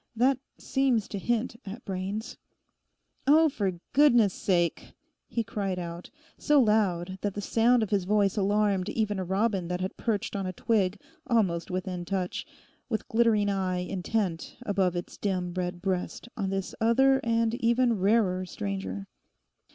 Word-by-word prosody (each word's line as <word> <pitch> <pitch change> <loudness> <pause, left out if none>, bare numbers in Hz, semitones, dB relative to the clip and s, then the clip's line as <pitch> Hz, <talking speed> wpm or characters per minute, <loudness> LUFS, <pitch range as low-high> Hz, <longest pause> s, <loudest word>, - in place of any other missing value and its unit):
That 255 +3 +3 0.2
seems 260 -6 +1
to 200 - -4
hint 235 +2 -1
at 205 +4 -8
brains... 195 +3 -4 0.9
Oh, 315 +2 +6
for 200 -8 -1 0.2
goodness' 240 -9 +5
sake!' 175 -3 0 0.3
he 230 - -1
cried 195 -3 -3
out; 170 0 -6 0.3
so 295 -2 +4
loud 190 -6 +1
that 205 -2 -2
the - - -3
sound 230 +3 +3
of 215 - -4
his 195 -3 +1
voice 200 0 +2
alarmed 205 -1 +1
even 210 -3 -1
a - - -1
robin 190 0 0
that 180 +1 -2
had 185 +1 -4
perched 215 -3 -2
on 195 -2 -2
a 185 - -4
twig 200 -1 +1 0.3
almost 190 -8 +1
within 185 -1 -3
touch, 185 0 -3 0.4
with 220 -3 -2
glittering 225 -3 +3
eye 190 -2 0
intent 185 -1 -2
above 190 -5 +1
its 175 - -5
dim 180 -3 -1
red 180 -1 -3
breast 190 +3 -2
on 200 -5 -2
this 195 -1 -3
other 265 +4 +4
and 230 -1 +1
even 235 -1 +3
rarer 190 -2 +2
stranger. 100 - -4
200 Hz, 150 wpm, -28 LUFS, 185-225 Hz, 0.9 s, Oh